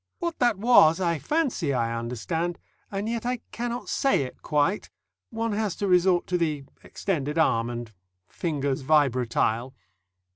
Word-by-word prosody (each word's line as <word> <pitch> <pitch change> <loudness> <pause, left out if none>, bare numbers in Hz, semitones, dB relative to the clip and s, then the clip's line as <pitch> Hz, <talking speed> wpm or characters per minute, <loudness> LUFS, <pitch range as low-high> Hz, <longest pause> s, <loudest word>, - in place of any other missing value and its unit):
What 340 -3 -3
that 240 -5 +3
was 190 -7 +6
I 170 -4 0
fancy 245 - 0
I 115 -1 0
understand, 125 +9 -3 0.3
and 200 +1 -3
yet 230 0 -2
I 250 +1 -1
cannot 240 +1 -4
say 270 - +2
it 130 - -9
quite. 155 +6 0 0.4
One 230 0 -2
has 210 -2 -1
to 200 - -2
resort 180 -1 +3
to 180 -1 -1
the 155 -4 -1 0.2
extended 150 -6 -3
arm 115 -7 +2
and 120 -2 -6 0.3
fingers 140 - -2
vibratile. 130 -3 +1
165 Hz, 145 wpm, -26 LUFS, 135-215 Hz, 0.4 s, was